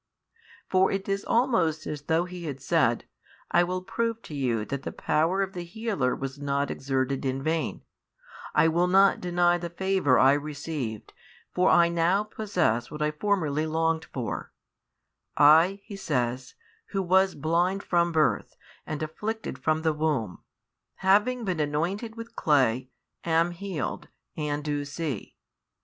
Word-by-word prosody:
For 190 Hz, 0 st, +3 dB
it 195 Hz, 0 st, -3 dB
is 195 Hz, 0 st, -1 dB
almost 195 Hz, -, +1 dB
as 150 Hz, -1 st, -5 dB
though 160 Hz, +3 st, +1 dB
he 175 Hz, -4 st, -6 dB
said: 135 Hz, -4 st, +1 dB, 0.5 s
I 175 Hz, -, +5 dB
will 180 Hz, +1 st, -3 dB
prove 230 Hz, +3 st, -2 dB
to -, -, -10 dB
you 120 Hz, -6 st, -1 dB
that 140 Hz, +2 st, -4 dB
the -, -, -5 dB
power 170 Hz, +6 st, +1 dB
of 195 Hz, 0 st, -5 dB
the 175 Hz, -, -5 dB
Healer 175 Hz, -, -1 dB
was 135 Hz, +1 st, -6 dB
not 140 Hz, 0 st, -1 dB
exerted 135 Hz, 0 st, -1 dB
in 135 Hz, 0 st, -2 dB
vain; 160 Hz, +1 st, -1 dB, 0.7 s
I -, -, +5 dB
will 170 Hz, +2 st, +2 dB
not 195 Hz, +2 st, +4 dB
deny 175 Hz, 0 st, +2 dB
the 170 Hz, 0 st, -5 dB
favour 185 Hz, -6 st, +2 dB
I 135 Hz, +1 st, +6 dB
received, 145 Hz, -6 st, -4 dB, 0.4 s
for 180 Hz, +1 st, +3 dB
I 170 Hz, -1 st, +6 dB
now 170 Hz, +4 st, +2 dB
possess 180 Hz, -, -1 dB
what 150 Hz, 0 st, -4 dB
I 150 Hz, -, +1 dB
formerly 155 Hz, -3 st, 0 dB
longed 160 Hz, 0 st, 0 dB
for; 125 Hz, -4 st, -5 dB, 0.9 s
I, 165 Hz, +7 st, +6 dB
he 210 Hz, -, -9 dB
says, 125 Hz, -8 st, -2 dB, 0.3 s
who 195 Hz, -1 st, -2 dB
was 190 Hz, +1 st, +3 dB
blind 175 Hz, +6 st, 0 dB
from 170 Hz, -1 st, +2 dB
birth 155 Hz, -2 st, +1 dB, 0.3 s
and 155 Hz, 0 st, -3 dB
afflicted 210 Hz, -1 st, -4 dB
from 155 Hz, +4 st, 0 dB
the 160 Hz, -1 st, +2 dB
womb, 150 Hz, -, -1 dB, 0.5 s
having 210 Hz, +6 st, +2 dB
been 185 Hz, -4 st, -1 dB
anointed 175 Hz, +10 st, -2 dB
with 230 Hz, 0 st, -9 dB
clay, 130 Hz, -4 st, +2 dB, 0.3 s
am 165 Hz, +1 st, +2 dB
healed, 175 Hz, -4 st, -4 dB, 0.3 s
and 150 Hz, -1 st, -2 dB
do 145 Hz, -1 st, -2 dB
see. 145 Hz, -, -5 dB
160 Hz, 150 wpm, -27 LUFS, 145-190 Hz, 0.9 s, I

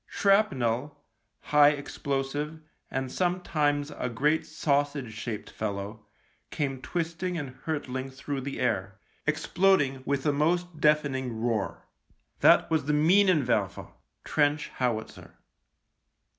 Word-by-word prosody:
Shrapnel, 145 Hz, -, +1 dB, 0.4 s
high 150 Hz, 0 st, +5 dB
ex 145 Hz, -1 st, -8 dB
plosive, 145 Hz, +3 st, -2 dB, 0.3 s
and 135 Hz, -1 st, -3 dB
sometimes 155 Hz, -5 st, 0 dB
a 125 Hz, -, -3 dB
great 150 Hz, +7 st, +1 dB
sausage 140 Hz, -4 st, 0 dB
shaped 110 Hz, 0 st, -5 dB
fellow, 105 Hz, 0 st, -5 dB, 0.4 s
came 135 Hz, -3 st, -2 dB
twisting 175 Hz, +2 st, -3 dB
and 140 Hz, -5 st, -4 dB
hurtling 135 Hz, -4 st, -3 dB
through 135 Hz, +1 st, -5 dB
the 135 Hz, +1 st, -5 dB
air, 100 Hz, -6 st, -1 dB, 0.3 s
exploding, 160 Hz, -9 st, +2 dB
with 140 Hz, 0 st, -1 dB
a 145 Hz, -, +3 dB
most 170 Hz, +3 st, 0 dB
deafening 135 Hz, -6 st, +1 dB
roar. 115 Hz, -2 st, -2 dB, 0.5 s
That -, -, +6 dB
was 155 Hz, -3 st, +1 dB
the 150 Hz, -, +1 dB
Minenwerfer 170 Hz, -1 st, +3 dB, 0.3 s
(trench 145 Hz, 0 st, +1 dB
howitzer). 115 Hz, -4 st, -3 dB
145 Hz, 110 wpm, -28 LUFS, 130-155 Hz, 0.5 s, That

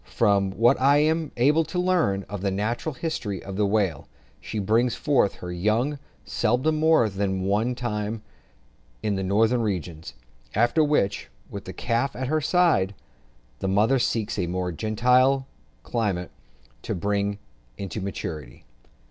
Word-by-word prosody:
From 100 Hz, -4 st, +3 dB
what 115 Hz, +6 st, +3 dB
I 140 Hz, +2 st, +5 dB
am 155 Hz, +1 st, +1 dB
able 150 Hz, +7 st, +4 dB
to 180 Hz, -, -5 dB
learn 175 Hz, -, +1 dB
of 100 Hz, -2 st, -6 dB
the 100 Hz, -, 0 dB
natural 115 Hz, +9 st, -2 dB
history 125 Hz, -, -4 dB
of 95 Hz, -1 st, -7 dB
the 105 Hz, 0 st, +1 dB
whale, 100 Hz, -8 st, 0 dB, 0.3 s
she 110 Hz, -, -6 dB
brings 115 Hz, +4 st, +2 dB
forth 135 Hz, -5 st, +2 dB
her 90 Hz, -, -7 dB
young 110 Hz, +11 st, 0 dB, 0.3 s
seldom 125 Hz, +7 st, +1 dB
more 160 Hz, -7 st, +4 dB
than 95 Hz, -2 st, -2 dB
one 100 Hz, +4 st, +1 dB
at -, -, 0 dB
a 125 Hz, -, -11 dB
time 105 Hz, -1 st, -3 dB, 0.8 s
in 105 Hz, -, 0 dB
the 95 Hz, -, -2 dB
northern 110 Hz, +5 st, +2 dB
regions, 85 Hz, -, -4 dB, 0.4 s
after 120 Hz, +9 st, +3 dB
which, 145 Hz, -, 0 dB, 0.2 s
with -, -, -7 dB
the -, -, -6 dB
calf 120 Hz, +4 st, -1 dB
at 130 Hz, 0 st, -3 dB
her 155 Hz, +1 st, +1 dB
side, 155 Hz, -, +2 dB, 0.6 s
the -, -, -2 dB
mother 110 Hz, +7 st, +3 dB
seeks 110 Hz, -3 st, -1 dB
a 90 Hz, -, 0 dB
more 90 Hz, +1 st, -2 dB
genial 125 Hz, -, +2 dB, 0.4 s
climate, 100 Hz, -8 st, -2 dB, 0.5 s
to -, -, -3 dB
bring 100 Hz, +2 st, -1 dB, 0.4 s
it 95 Hz, -3 st, -6 dB
to 105 Hz, -, -4 dB
maturity. 80 Hz, -9 st, -6 dB
110 Hz, 155 wpm, -25 LUFS, 100-130 Hz, 0.8 s, I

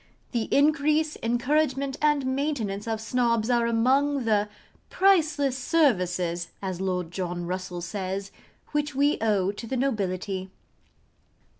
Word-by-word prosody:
The 235 Hz, -3 st, -1 dB
increase, 305 Hz, +1 st, +3 dB
encouragement, 270 Hz, +3 st, 0 dB
and 295 Hz, -2 st, +2 dB
maintenance 260 Hz, -7 st, -2 dB
of 225 Hz, -1 st, -1 dB
Snobs 230 Hz, 0 st, +1 dB
are 235 Hz, -1 st, +2 dB
among 260 Hz, +4 st, +2 dB
the 210 Hz, -2 st, +2 dB, 0.4 s
'priceless 310 Hz, -8 st, +3 dB
services,' 180 Hz, -, +1 dB
as 190 Hz, -2 st, -4 dB
Lord 180 Hz, -3 st, -2 dB
John 175 Hz, -1 st, -3 dB
Russell 180 Hz, 0 st, -4 dB
says, 195 Hz, +2 st, -4 dB, 0.4 s
which 295 Hz, -1 st, -1 dB
we 285 Hz, +2 st, +2 dB
owe 200 Hz, -4 st, +2 dB
to 220 Hz, +3 st, -8 dB
the 260 Hz, -, -2 dB
nobility. 195 Hz, -6 st, -2 dB
230 Hz, 120 wpm, -26 LUFS, 190-280 Hz, 0.4 s, increase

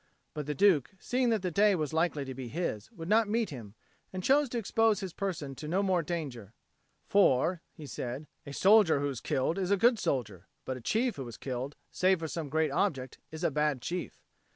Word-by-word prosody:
But 150 Hz, -2 st, -5 dB
the 150 Hz, -, -2 dB
Duke, 185 Hz, 0 st, +3 dB
seeing 250 Hz, +5 st, 0 dB
that 220 Hz, -4 st, +1 dB
the 180 Hz, -, -1 dB
day 205 Hz, +3 st, +4 dB
was 155 Hz, -3 st, -2 dB
likely 160 Hz, -3 st, 0 dB
to 130 Hz, -, -6 dB
be 130 Hz, -1 st, -6 dB
his, 120 Hz, -, -3 dB
would 165 Hz, -1 st, -8 dB
not 220 Hz, +2 st, +4 dB
meet 225 Hz, -2 st, 0 dB
him 115 Hz, -6 st, -9 dB, 0.4 s
and 185 Hz, -1 st, -5 dB
chose 280 Hz, +3 st, +4 dB
to 240 Hz, -, -3 dB
expose 225 Hz, -1 st, +2 dB
his 190 Hz, -3 st, -5 dB
person 170 Hz, -8 st, -3 dB
to 150 Hz, +3 st, -8 dB
no 185 Hz, +5 st, +1 dB
more 185 Hz, -3 st, +2 dB
danger: 140 Hz, -, -5 dB, 0.5 s
"For," 175 Hz, -2 st, +3 dB
he 155 Hz, -, -11 dB
said, 130 Hz, +1 st, -5 dB, 0.2 s
"a 140 Hz, -, -9 dB
soldier 195 Hz, -1 st, +5 dB
who 145 Hz, 0 st, 0 dB
is 130 Hz, -4 st, -5 dB
killed 160 Hz, +8 st, 0 dB
is 185 Hz, -1 st, -1 dB
a 200 Hz, -, +3 dB
good 235 Hz, +3 st, +4 dB
soldier; 105 Hz, -, -2 dB, 0.2 s
but 130 Hz, -, -3 dB
a 125 Hz, -, -9 dB
chief 230 Hz, -, 0 dB
who 135 Hz, -3 st, -5 dB
is 115 Hz, -, -9 dB
killed 130 Hz, +2 st, -4 dB, 0.2 s
save 185 Hz, +1 st, +3 dB
for 165 Hz, -1 st, -4 dB
some 160 Hz, -2 st, -4 dB
great 155 Hz, 0 st, +1 dB
object 135 Hz, -6 st, -1 dB
is 160 Hz, +2 st, -8 dB
a 170 Hz, -, +2 dB
bad 150 Hz, -1 st, +1 dB
chief." 175 Hz, +8 st, -5 dB
160 Hz, 220 wpm, -30 LUFS, 135-195 Hz, 0.5 s, soldier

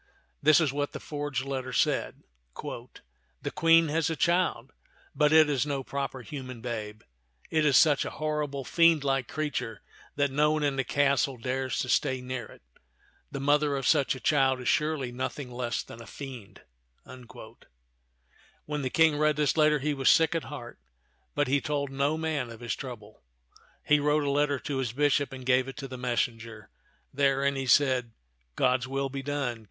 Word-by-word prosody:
This 155 Hz, +1 st, +6 dB
is 155 Hz, -5 st, +1 dB
what 145 Hz, 0 st, -2 dB
the -, -, -5 dB
forged 145 Hz, -3 st, -4 dB
letter 130 Hz, -2 st, -4 dB
said: -, -, 0 dB, 0.2 s
" -, -, -43 dB
The -, -, -9 dB
Queen 165 Hz, -1 st, +4 dB
has 160 Hz, +2 st, 0 dB
a 160 Hz, -, -2 dB
child, 170 Hz, -5 st, 0 dB, 0.4 s
but 150 Hz, -1 st, +3 dB
it 155 Hz, -1 st, +7 dB
is 140 Hz, -4 st, +1 dB
no 140 Hz, -2 st, -3 dB
proper 135 Hz, -1 st, -4 dB
human 130 Hz, -3 st, -7 dB
babe; 110 Hz, -2 st, -6 dB, 0.5 s
it 155 Hz, -1 st, +2 dB
is 140 Hz, -, +5 dB
such 150 Hz, -3 st, +5 dB
a -, -, -4 dB
horrible, 150 Hz, -3 st, -2 dB
iiendlike 140 Hz, -6 st, +3 dB
creature 145 Hz, -8 st, -4 dB, 0.3 s
that 145 Hz, -1 st, +1 dB
no 150 Hz, +2 st, +3 dB
one 155 Hz, -1 st, -1 dB
in 140 Hz, -2 st, +1 dB
the 135 Hz, -, +1 dB
castle 140 Hz, -1 st, +1 dB
dares 130 Hz, +2 st, -2 dB
to -, -, -3 dB
stay 130 Hz, +1 st, +1 dB
near 125 Hz, -1 st, -5 dB
it. -, -, -17 dB, 0.7 s
The 140 Hz, -, -5 dB
mother 145 Hz, 0 st, +2 dB
of 135 Hz, -, -4 dB
such 140 Hz, -1 st, +3 dB
a -, -, -8 dB
child 135 Hz, -2 st, +2 dB
is 125 Hz, -, -6 dB
surely 150 Hz, -5 st, 0 dB
nothing 130 Hz, +1 st, -5 dB
less 120 Hz, -1 st, -3 dB
than 115 Hz, -, -12 dB
a 115 Hz, -, -12 dB
fiend." 130 Hz, -8 st, -10 dB, 0.4 s
When 60 Hz, -, -12 dB
the 130 Hz, -, -2 dB
King 160 Hz, 0 st, +3 dB
read 150 Hz, 0 st, +3 dB
this 150 Hz, -2 st, +1 dB
letter, 155 Hz, -1 st, +4 dB
he 150 Hz, +1 st, -1 dB
was 135 Hz, -2 st, +2 dB
sick 160 Hz, 0 st, +4 dB
at 165 Hz, -6 st, -2 dB
heart, 120 Hz, -2 st, -9 dB, 0.6 s
but 145 Hz, -2 st, +1 dB
he 140 Hz, +2 st, +2 dB
told 140 Hz, +2 st, -2 dB
no 140 Hz, +3 st, 0 dB
man 155 Hz, -6 st, -2 dB
of 115 Hz, -1 st, -10 dB
his 120 Hz, -, -2 dB
trouble. 110 Hz, -, -9 dB, 0.6 s
He 150 Hz, 0 st, +4 dB
wrote 150 Hz, +1 st, +2 dB
a 140 Hz, -, 0 dB
letter 145 Hz, 0 st, +1 dB
to 145 Hz, -3 st, -3 dB
his 125 Hz, -4 st, -2 dB
bishop 145 Hz, +1 st, +1 dB
and 130 Hz, -1 st, -9 dB
gave 130 Hz, 0 st, +3 dB
it 135 Hz, -, -8 dB
to 140 Hz, -2 st, -6 dB
the 130 Hz, -, -8 dB
messenger. 115 Hz, -3 st, -3 dB, 0.4 s
Therein 140 Hz, 0 st, +2 dB
he 135 Hz, -1 st, -3 dB
said, 125 Hz, -3 st, +3 dB, 0.2 s
" -, -, -44 dB
God's 130 Hz, 0 st, +1 dB
will 135 Hz, +1 st, -2 dB
be 135 Hz, 0 st, -5 dB
done. 135 Hz, -4 st, -3 dB
135 Hz, 185 wpm, -28 LUFS, 125-150 Hz, 0.7 s, it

